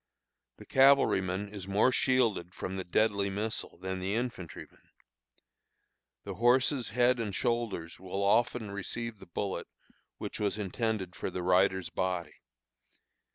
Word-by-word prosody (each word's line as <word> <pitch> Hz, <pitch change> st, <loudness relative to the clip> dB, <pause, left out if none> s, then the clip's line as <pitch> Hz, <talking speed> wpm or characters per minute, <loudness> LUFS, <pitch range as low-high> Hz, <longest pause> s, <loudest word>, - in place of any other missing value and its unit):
The -, -, -12 dB
cavalryman 105 Hz, -8 st, +4 dB
is 100 Hz, -2 st, -7 dB
more 100 Hz, +6 st, +3 dB
shielded 115 Hz, -10 st, +1 dB
from 95 Hz, -, -4 dB
the 95 Hz, -, -3 dB
deadly 100 Hz, +2 st, +1 dB
missile 105 Hz, 0 st, -3 dB
than 95 Hz, +1 st, -4 dB
the 95 Hz, +3 st, -1 dB
infantryman. 120 Hz, -8 st, -5 dB, 1.4 s
The 100 Hz, -, -5 dB
horse's 125 Hz, +5 st, +3 dB
head 125 Hz, +3 st, +3 dB
and 105 Hz, -4 st, -3 dB
shoulders 115 Hz, -9 st, -2 dB
will 95 Hz, +2 st, -3 dB
often 110 Hz, +1 st, +2 dB
receive 110 Hz, +3 st, -4 dB
the -, -, -13 dB
bullet 95 Hz, +3 st, -3 dB, 0.5 s
which -, -, -5 dB
was 105 Hz, 0 st, 0 dB
intended 105 Hz, -2 st, -2 dB
for -, -, -3 dB
the 90 Hz, -1 st, -4 dB
rider's 90 Hz, -1 st, +2 dB
body. 90 Hz, -3 st, -2 dB
100 Hz, 130 wpm, -31 LUFS, 95-115 Hz, 1.4 s, cavalryman